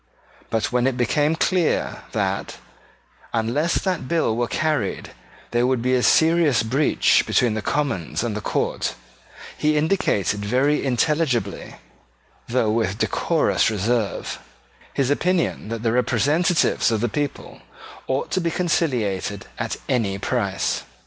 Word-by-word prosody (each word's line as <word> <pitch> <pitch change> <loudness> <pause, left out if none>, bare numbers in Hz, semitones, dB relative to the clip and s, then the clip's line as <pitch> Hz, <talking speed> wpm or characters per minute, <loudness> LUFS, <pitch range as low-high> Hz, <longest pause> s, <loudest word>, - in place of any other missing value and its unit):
But 110 -1 -1
when 125 +1 +2
it 130 -2 -1
became 145 +6 +1
clear 175 0 0
that, - - -2 0.8
unless 120 +9 0
that 180 -8 -1
bill 160 -7 +1
were 120 +1 0
carried, 155 -10 -1 0.4
there 120 +1 +2
would 130 -2 0
be 130 +1 +1
a 125 - +3
serious 160 -3 +4
breach 135 +7 +3
between 120 -3 +2
the 110 - -2
Commons 115 - -1
and 115 -3 -2
the 105 - -3
court, - - -1 0.6
he 150 0 +1
indicated 105 - +1
very 130 +8 +1
intelligibly, 135 -5 0 0.7
though 115 -3 +1
with 110 -3 0
decorous - - +1
reserve, 110 +1 -1 0.5
his 135 0 0
opinion 170 - 0
that 115 0 -4
the 115 - +2
representatives 145 - +2
of 110 -2 0
the 120 - 0
people 145 +4 -4 0.5
ought 130 +1 -2
to 185 - +1
be 170 - 0
conciliated 125 - -1
at - - -2
any 105 -6 0
price. 100 - -1
125 Hz, 130 wpm, -22 LUFS, 110-155 Hz, 0.8 s, serious